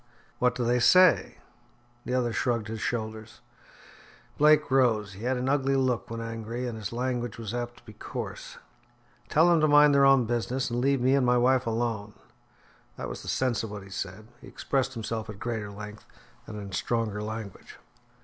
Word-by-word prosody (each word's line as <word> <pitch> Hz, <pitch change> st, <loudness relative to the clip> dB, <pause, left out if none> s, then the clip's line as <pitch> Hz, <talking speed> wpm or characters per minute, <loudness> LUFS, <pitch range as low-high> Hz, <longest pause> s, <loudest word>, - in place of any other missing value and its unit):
"What 125 Hz, 0 st, +2 dB
do 125 Hz, -, -1 dB
they 120 Hz, +1 st, +2 dB
say?" 180 Hz, +8 st, +5 dB, 0.7 s
The 125 Hz, -, -1 dB
other 120 Hz, -2 st, 0 dB
shrugged 115 Hz, -3 st, -1 dB
his 110 Hz, 0 st, -5 dB
shoulders. 110 Hz, -1 st, -4 dB, 1.0 s
Blake 150 Hz, -1 st, +4 dB
rose. 115 Hz, -7 st, +2 dB
He 100 Hz, +5 st, -8 dB
had 130 Hz, 0 st, +1 dB
an 125 Hz, +1 st, -2 dB
ugly 135 Hz, 0 st, +1 dB
look 125 Hz, -7 st, 0 dB
when 115 Hz, 0 st, -5 dB
angry, 115 Hz, +1 st, -5 dB
and 120 Hz, -, -4 dB
his 105 Hz, -2 st, -5 dB
language 120 Hz, -1 st, -3 dB
was 115 Hz, -2 st, -6 dB
apt 120 Hz, 0 st, -4 dB
to -, -, -19 dB
be 110 Hz, -, -12 dB
coarse. -, -, -7 dB, 0.7 s
"Tell 160 Hz, +3 st, +4 dB
them 170 Hz, -2 st, +4 dB
to 155 Hz, -, +4 dB
mind 145 Hz, 0 st, +6 dB
their 140 Hz, 0 st, +5 dB
own 135 Hz, -3 st, +5 dB
business, 120 Hz, +2 st, -2 dB
and 120 Hz, +1 st, -1 dB
leave 135 Hz, 0 st, +2 dB
me 130 Hz, +2 st, +3 dB
and 140 Hz, -1 st, +3 dB
my 125 Hz, 0 st, +3 dB
wife 130 Hz, 0 st, +2 dB
alone." 110 Hz, -2 st, -2 dB, 0.8 s
That -, -, -5 dB
was -, -, -7 dB
the -, -, -12 dB
sense 130 Hz, -4 st, 0 dB
of 110 Hz, -, -5 dB
what 105 Hz, -1 st, -7 dB
he 95 Hz, -, -14 dB
said; 100 Hz, +3 st, -6 dB
he -, -, -12 dB
expressed 135 Hz, -2 st, -2 dB
himself 110 Hz, -1 st, -4 dB
at 105 Hz, -, -7 dB
greater 110 Hz, -2 st, -4 dB
length, 105 Hz, +1 st, -10 dB, 0.4 s
and 105 Hz, -1 st, -7 dB
in 100 Hz, -1 st, -8 dB
stronger 110 Hz, +1 st, -1 dB
language. 110 Hz, -2 st, -7 dB
120 Hz, 190 wpm, -27 LUFS, 110-130 Hz, 1.0 s, mind